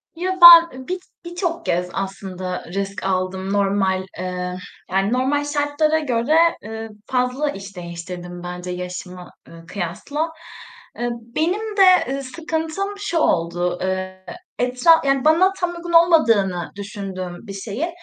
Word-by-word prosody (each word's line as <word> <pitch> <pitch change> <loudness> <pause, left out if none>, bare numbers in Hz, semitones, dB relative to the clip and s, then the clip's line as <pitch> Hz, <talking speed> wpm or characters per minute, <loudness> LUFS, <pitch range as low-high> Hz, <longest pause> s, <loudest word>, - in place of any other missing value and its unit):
Ya, 370 +2 -2
ben, 335 -4 +10
ııı, 260 - -10
bir 370 +1 -2 0.3
birçok 345 -1 -3
kez 180 +1 0
aslında 190 -2 -5
risk 195 0 -3
aldım 190 0 -2
normal, 195 -2 +1
eee, 180 0 -4 0.4
yani, 195 +4 +1
normal 270 +3 +1
şartlara 290 +2 +1
göre, 260 +1 +1 0.3
ııı, 225 +1 -6 0.2
fazla 255 +3 0
iş 195 -3 -8
değiştirdim 175 0 -8
bence 180 0 -6
yaşıma, 180 0 -7 0.2
ııı, 165 0 -13
kıyasla. 210 - -3 0.7
Iıı, 240 0 -1 0.3
benim 410 +7 -1
de, 370 -8 +5
ııı, 275 0 -3
sıkıntım 320 +7 -3
şu 400 -4 -2
oldu. 175 - +1
Iıı, 185 0 -3 0.4
etra 250 +6 +3
yani, 275 -1 +1
bana 350 +5 +5
tam 355 -1 0
uygun 340 0 -7
olmadığını 230 - +4
düşündüğüm 195 -2 -7
bir 200 - -6
şeyin, 215 - -4
215 Hz, 135 wpm, -21 LUFS, -, 0.7 s, ben